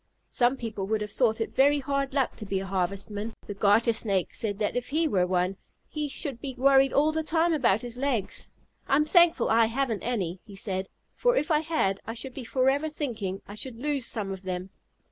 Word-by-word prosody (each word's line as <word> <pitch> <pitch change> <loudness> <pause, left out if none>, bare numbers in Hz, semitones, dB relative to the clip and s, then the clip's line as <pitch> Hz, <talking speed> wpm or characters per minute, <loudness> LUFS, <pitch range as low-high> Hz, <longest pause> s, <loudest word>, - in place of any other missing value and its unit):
Some 245 +2 +2
people 215 -5 -4
would 215 0 0
have 210 0 -4
thought 230 -4 +2
it 225 - -3
very 285 +2 +4
hard 275 0 -2
luck 270 -3 +1
to 215 - -7
be 195 - -1
Harvestmen. 195 +3 -3
The 205 - -5
Garter 210 +4 +3
Snake 200 -5 0
said 205 -3 -3
that 210 -1 -1
if 245 0 -2
he 315 +3 +1
were 185 -9 +2
one, 180 +1 0 0.3
he 300 -1 -3
should 270 -4 -4
be 265 -3 -5
worried 270 +1 +5
all 300 +2 +3
the 320 0 -1
time 325 +2 +1
about 235 -8 +2
his 240 0 -6
legs. 250 -7 -2 0.4
"I'm 295 +2 +3
thankful 335 - +4
I 225 0 +5
haven't 235 -2 -1
any," 190 -7 -2
he 205 -2 -13
said, 190 -2 -3 0.2
"for - - +2
if 330 -6 0
I 300 - +4
had 305 -12 0
I 225 - -6
should 250 +2 -5
be 265 - -7
forever 270 +5 +1
thinking 225 -11 -4
I 205 - -8
should 230 +3 -7
lose 280 0 -1
some 205 -4 -2
of 190 -1 -6
them. 185 0 -5
235 Hz, 210 wpm, -27 LUFS, 200-275 Hz, 0.4 s, worried